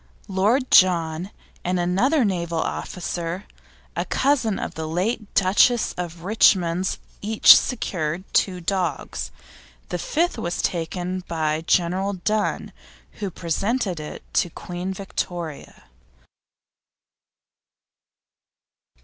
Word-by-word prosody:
Lord 215 +7 +1
John 170 -1 +4 0.3
and 180 0 0
another 230 - +2
naval 170 -4 -1
officer, 175 +2 -3 0.5
a - - 0
cousin 260 -7 +1
of - - -4
the 160 0 -5
late 205 +6 -2
Duchess 205 +5 +4
of 170 -1 -6
Richmond's, 185 -3 +3 0.2
each 215 +1 +8
secured 175 - -1
two 185 -2 +2
dogs; 175 -4 -2 0.6
the 180 - -3
fifth 340 - 0
was 175 +1 -2
taken 180 +2 -2
by 155 -1 -1
General 185 +3 +2
Dunne, 210 +3 -1 0.5
who 205 -2 -2
presented 185 +3 -1
it 150 - -8
to 175 - +2
Queen 175 +3 -5
Victoria. 175 -5 -5
185 Hz, 100 wpm, -23 LUFS, 170-200 Hz, 0.6 s, each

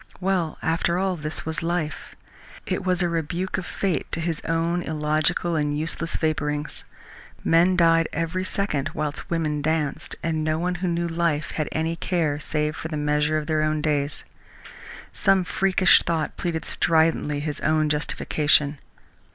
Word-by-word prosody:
Well, 185 -4 0
after 170 +1 +1
all, 190 0 0
this 150 -1 -4
was 160 -1 -1
life. 165 -3 -3 0.5
It - - -2
was 180 -1 +1
a - - +2
rebuke 170 +3 -2
of 180 - -7
fate 190 -4 -2
to - - 0
his 165 -1 -2
own 165 +2 0
illogical 155 +2 0
and 150 -1 0
useless 165 +1 -2
vapourings. 150 -2 -2 0.6
Men 175 +3 +4
died 165 -1 +4
every 165 +3 -2
second 185 -7 -1
whilst 150 -1 -3
women 155 -3 0
danced, 155 0 -1
and 160 -1 0
no 155 0 +1
one 180 +2 0
who 185 - 0
knew 170 0 0
life 165 -3 0
had 155 -2 -2
any 160 +1 -1
care 165 -4 0
save 155 0 -1
for - - -5
the 155 -1 -4
measure 150 +1 +1
of 155 - -2
their 155 0 +1
own 155 0 +1
days. 145 -1 -1 0.9
Some 195 -1 +3
freakish 185 -2 +4
thought 165 -2 -1
pleaded 165 -2 -3
stridently 160 -3 +2
his 150 0 -3
own 155 0 +2
justification. 150 -1 +2
160 Hz, 160 wpm, -24 LUFS, 150-170 Hz, 0.9 s, Men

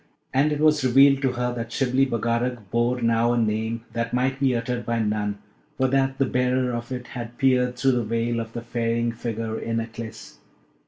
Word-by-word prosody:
And 145 +3 +3
it 150 - -1
was 155 -2 +3
revealed 135 +2 +5
to 135 -2 +1
her 125 0 -1
that 115 -1 -5
Shibli 135 +1 +2
Bagarag 115 -2 -2
bore 120 +1 +1
now 115 +1 +3
a - - 0
name 110 0 -1
that 115 +1 -2
might 130 +2 0
be 135 -2 +2
uttered 120 +1 -2
by 115 0 -1
none, 105 -2 -1 0.4
for 130 - +2
that 135 0 +1
the 135 - +2
bearer 125 0 +1
of 120 +1 -5
it 125 -1 -5
had 120 -1 -7
peered 125 -2 +2
through 135 +2 +2
the 125 -2 +1
veil 115 +1 -1
of 115 0 -6
the 120 - -5
ferrying 115 0 -1
figure 115 -1 -4
in 115 0 -2
Aklis. 115 0 -8
120 Hz, 200 wpm, -24 LUFS, 115-130 Hz, 0.4 s, revealed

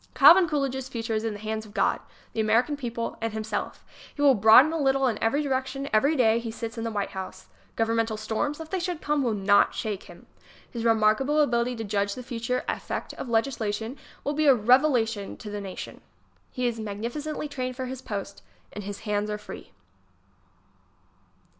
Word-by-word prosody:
Calvin 350 -1 +8
Coolidge's 265 -3 -2
future 230 -2 -3
is 215 0 0
in 225 -1 -2
the 205 - -8
hands 220 +1 -3
of 215 0 -15
God - - +2 0.3
the - - -4
American 225 +7 +2
people 235 -4 -4
and 225 -1 -2
himself. 215 -1 -4 0.3
He 290 - -2
will 280 -2 +7
broaden 225 +8 +7
a 325 - -1
little 270 -1 +2
in 230 -5 0
every 280 +7 +1
direction 270 0 -2
every 280 +9 +4
dav 230 -3 +3
he 230 - -5
sits 225 0 -6
in 225 - -4
the 230 - -1
White 205 -3 -3
House. 190 -1 -7 0.3
Governmental 225 -1 0
storms, 220 +8 -2
'if 320 -1 -8
they 380 - 0
should 350 -2 -3
come 295 -1 0
will 235 -5 0
not 200 0 +3
shake 210 -3 -3
him. - - -14 0.4
His 230 -2 -6
remarkable 225 +6 +3
ability 245 -3 +2
to 225 - -5
judge 200 -1 -1
the 255 - -7
future 245 0 -2
effect - - -4
of 260 - -7
legislation 225 -1 -1 0.3
will 290 - -1
be 305 0 +1
a 275 - +8
revelation 235 -3 +2
to 210 - -8
the 205 0 -4
nation. 190 -2 -8 0.5
He 250 - -3
is 235 -2 -1
magnificently 235 +9 -4
trained 255 -3 -4
for 260 0 -4
his 255 0 -6
post, 200 -4 -6 0.3
and 210 - -6
his 200 0 -6
hands 210 -1 -1
are 210 - -2
free. 210 - -10
230 Hz, 190 wpm, -26 LUFS, 215-270 Hz, 0.5 s, Calvin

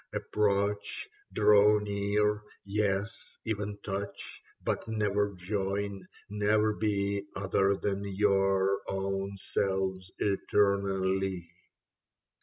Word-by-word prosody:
Approach, 100 - 0 0.2
draw 105 0 +6
near. 105 +1 0 0.2
Yes, 100 +1 -2
even 105 -2 -2
touch: 100 0 -5 0.2
but - - -1
never 105 -2 0
join, 100 +1 -3 0.2
never 105 +1 +2
be 100 -1 -1
Other 95 0 +2
than 100 0 -2
your 95 -1 +2
own 95 0 -2
selves 95 -1 -1
eternally." 95 -3 +1
100 Hz, 80 wpm, -30 LUFS, 95-105 Hz, 0.2 s, draw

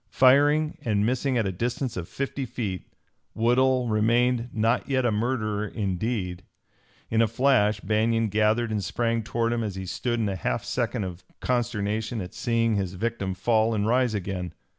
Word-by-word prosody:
Firing 145 +4 +4
and 105 -6 +1
missing 130 +2 0
at 115 - +1
a 95 - 0
distance 120 +6 -2
of 85 -2 -5
fifty 140 0 -3
feet, 110 -7 -4 0.5
Woodhull 125 +2 +3
remained 115 +3 +2
not 115 +4 0
yet 130 -2 +1
a 120 - +3
murderer 110 -2 -1
in 100 -4 -2
deed. 90 -5 -3 0.7
In 110 0 +3
a 115 - +4
flash 110 -3 +2
Banion 110 +1 +1
gathered 110 +3 +2
and 105 -2 -1
sprang 115 +4 0
toward 115 +1 -1
him 120 - -1
as 105 -3 -4
he 95 0 -5
stood 120 +5 -2
in 110 - +1
a 100 - -2
half 60 -9 -2
second - - -1
of 90 -1 -6 0.2
consternation 110 -2 -1
at 90 -2 -6
seeing 115 -2 +1
his 95 -2 -2
victim 100 -2 -2
fall 110 +2 +2
and 105 -1 0
rise 125 0 +2
again. 90 -3 -4
115 Hz, 175 wpm, -26 LUFS, 105-120 Hz, 0.7 s, Firing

